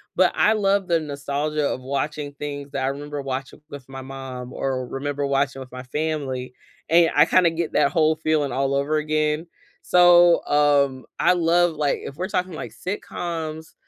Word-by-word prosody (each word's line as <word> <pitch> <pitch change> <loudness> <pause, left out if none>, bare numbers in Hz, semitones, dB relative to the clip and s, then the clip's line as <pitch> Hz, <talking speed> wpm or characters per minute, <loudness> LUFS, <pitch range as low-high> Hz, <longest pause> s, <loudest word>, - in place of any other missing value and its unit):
but 185 -1 +4
I 215 - +4
love 200 -2 +1
the 170 -1 +2
nostalgia 145 0 -2
of 130 - -3
watching 145 +2 -3
things 145 -1 -6
that 135 -2 -2
I - - 0
remember 145 +1 -4
watching 135 +1 -5
with 140 -3 -10
my 135 0 -7
mom 130 -2 -8
or 130 -2 -2
remember 145 +2 -3
watching 140 0 0
with 130 -1 -10
my 125 0 -8
family, 135 -3 -3 0.4
and 165 +1 +5
I 150 - +7
kinda 175 0 +4
get 165 0 -3
that 140 - +3
whole 155 0 +3
feeling 155 -4 0
all 135 +1 0
over 140 +3 0
again. 155 +1 0 0.3
So, 175 -1 +5
um, 140 -3 +2
I - - +4
love, 175 0 +2
like, 150 -2 0
if 140 - -7
we're 185 +4 -4
talking 180 -1 -2
like 155 - -6
sitcoms, 165 -4 -5
145 Hz, 175 wpm, -23 LUFS, 135-165 Hz, 0.4 s, I